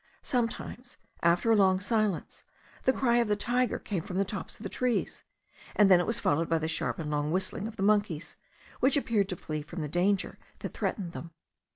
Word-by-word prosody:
Sometimes, 245 0 -3 0.2
after 175 +7 +3
a - - +6
long 190 -2 +4
silence, 210 -2 -1 0.4
the 260 - +6
cry 240 -3 +2
of 235 -2 +3
the 210 - +2
tiger 245 +3 0
came 195 -5 -3
from 180 +2 -5
the 195 - +2
tops 195 0 -5
of - - -12
the - - -2
trees; 245 +4 -1 0.5
and 205 -2 +5
then 180 - +8
it 175 - -1
was 230 +1 +1
followed 160 +3 +1
by 165 - +3
the 160 0 -2
sharp 160 - -1
and 150 -2 -4
long 150 0 0
whistling 190 +3 -1
of 225 - -8
the 195 - -3
monkeys, 205 -6 +1 0.4
which 270 +2 +4
appeared 215 -7 +1
to 180 - -2
flee 155 -2 -4
from 165 +3 -7
the - - -2
danger 185 +5 0 0.2
that - - -6
threatened 180 -5 -2
them. 170 - -7
195 Hz, 210 wpm, -29 LUFS, 170-230 Hz, 0.5 s, then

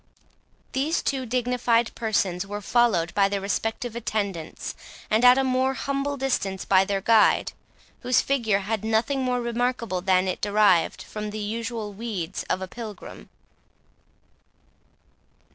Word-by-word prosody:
These 290 +6 0
two 265 -3 -1
dignified 245 -1 +1
persons 200 -5 0
were 205 +1 -4
followed 210 -8 +2
by 195 -1 +3
their 200 0 -1
respective 225 +4 -3
attendants, 200 -8 -3 0.4
and 220 +3 +3
at 250 +1 +8
a 270 - +3
more 260 +1 +1
humble 275 +1 -2
distance 200 -8 -2
by 190 0 +4
their 195 0 -1
guide, 220 +1 +4 0.5
whose 250 -1 +2
figure 225 -8 +1
had 215 +1 -3
nothing 225 +5 +1
more 250 -1 0
remarkable 235 -5 -1
than 185 0 +2
it 185 - -3
derived 205 -4 +3
from 210 0 -6
the 210 - -6
usual 220 0 -4
weeds 200 -6 -4
of 185 - 0
a - - -5
pilgrim. 210 - -9
220 Hz, 135 wpm, -25 LUFS, 195-245 Hz, 0.5 s, at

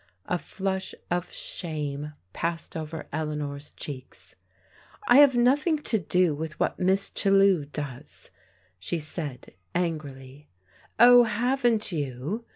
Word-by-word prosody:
A 180 - -1
flush 190 0 -4 0.2
of 175 0 -1
shame 150 -3 -5 0.2
passed 165 0 -3
over 160 0 -5
Eleanor's 150 -2 -4
cheeks. 130 -4 -9 0.4
" 420 - -21
I 245 - +7
have 280 -3 +7
nothing 285 +7 +3
to 220 - +1
do 180 -1 +2
with 155 +1 -6
what - - 0
Miss 190 +2 +2
Chellew 195 -5 +3
does," 145 -3 -7 0.5
she 95 - -2
said 150 -4 -6 0.2
angrily. 145 -5 -4 0.5
"Oh, 245 0 +8
haven't 235 0 +1
you?" 150 - -3
165 Hz, 120 wpm, -27 LUFS, 150-205 Hz, 0.5 s, Oh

